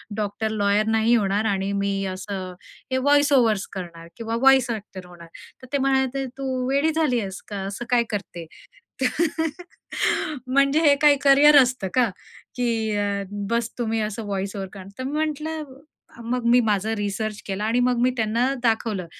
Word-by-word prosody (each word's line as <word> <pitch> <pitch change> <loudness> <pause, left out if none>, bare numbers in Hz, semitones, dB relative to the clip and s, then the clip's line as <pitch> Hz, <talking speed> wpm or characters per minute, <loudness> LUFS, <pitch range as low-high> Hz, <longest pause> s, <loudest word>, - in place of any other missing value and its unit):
Doctor-lawyer 210 0 0
नाही 225 +1 +3
होणार 205 -1 +1
आणि 195 -2 0
मी 200 0 0
असं 185 0 -5 0.4
हे 260 - +1
वॉईस-ओव्हर्स 270 -7 +3
करणार 170 -3 -8
किंवा 230 0 -3
वॉईस 270 -2 +5
ॲक्टर 200 -5 -6
होणार. 175 -1 -13 0.3
तर 255 - -12
ते - - +3
म्हणायचे, 270 0 0
"तू 260 -2 -2
वेडी 280 +4 +2
झाली 300 -7 +2
आहेस 195 -3 -6
का? 205 - -6
असं 200 +5 -5
काय 245 -1 +3
करते?" 175 -5 -5 0.6
तर 320 +5 0 1.0
"म्हणजे 275 +4 +3
हे 290 -3 +5
काय 295 -1 +6
करियर 285 +1 +7
असतं 250 -6 -2
का? 250 -2 +3 0.5
की 245 -1 0 0.3
अ, 200 -1 -1 0.3
बस 235 0 0
तुम्ही 225 -2 -1
असं 215 +1 -3
व्हॉईस-ओव्हर 195 -1 -4
करणार" 195 -2 -10
तर 260 - -4
मी 275 - -4
म्हटलं 310 +1 -4 0.6
अ - - -11
मग 245 +1 -2
मी 245 - +6
माझा 215 -1 0
रिसर्च 205 +1 -3
केला 195 +1 -3
आणि 225 +3 +1
मग 245 -1 +2
मी 250 +1 +3
त्यांना 230 +4 +1
दाखवलं, 220 -5 0
225 Hz, 165 wpm, -23 LUFS, 200-260 Hz, 1.0 s, करियर